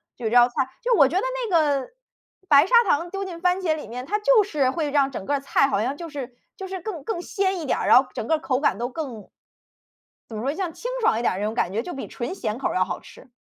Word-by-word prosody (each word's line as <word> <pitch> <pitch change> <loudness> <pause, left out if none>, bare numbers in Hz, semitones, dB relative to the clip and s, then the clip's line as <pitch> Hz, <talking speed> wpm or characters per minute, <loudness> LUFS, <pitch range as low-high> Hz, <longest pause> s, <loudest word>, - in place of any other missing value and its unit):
就 245 - -8
有 - - +1
这 - - 0
道 240 0 +8
菜。 - - -23 0.3
就 485 -1 +2
我 280 -6 +6
觉 325 - -4
得 380 - +2 0.3
那 - - +3
个 285 -4 0 0.6
白 285 -1 +7
砂 385 - -6 0.2
糖 335 +4 +1
丢 390 0 -3
进 350 -3 -7
番 360 +2 +1
茄 320 -4 +1
里 305 - -8
面， 250 +3 -7
它 415 - 0
就 440 +2 +4
是 290 -9 0
会 310 -1 -2
让 280 -1 +2
整 200 - -6
个 285 +6 0
菜 275 0 +2
好 215 -6 0
像 265 +4 -2
就 335 +1 -8
是 265 -4 -7 0.2
就 385 - -7
是 380 0 -5
更 355 -7 -6
更 350 -2 -3
鲜 380 -1 -1
一 - - -5
点 - - +1
儿， - - -2
然 - - +7
后 265 - -13
整 - - -3
个 320 - +2
口 265 -2 -1
感 225 -8 +1
都 240 +1 -2
更 255 -7 -7 1.0
怎 220 - -7
么 215 - -4
说？ 275 +4 -1
像 350 -1 -3
清 - - -5
爽 430 - +2
一 235 - -2
点 - - +2
儿 185 - -4
那 205 - -2
种 215 - -2
感 190 -5 0
觉， 225 +3 -1
就 355 - -7
比 270 - -6
纯 245 +9 -5
咸 225 - -3
口 - - -1
儿 - - -4
要 185 0 +2
好 175 - -5
吃。 265 - -16
285 Hz, 315 characters per minute, -24 LUFS, 245-360 Hz, 1.0 s, 道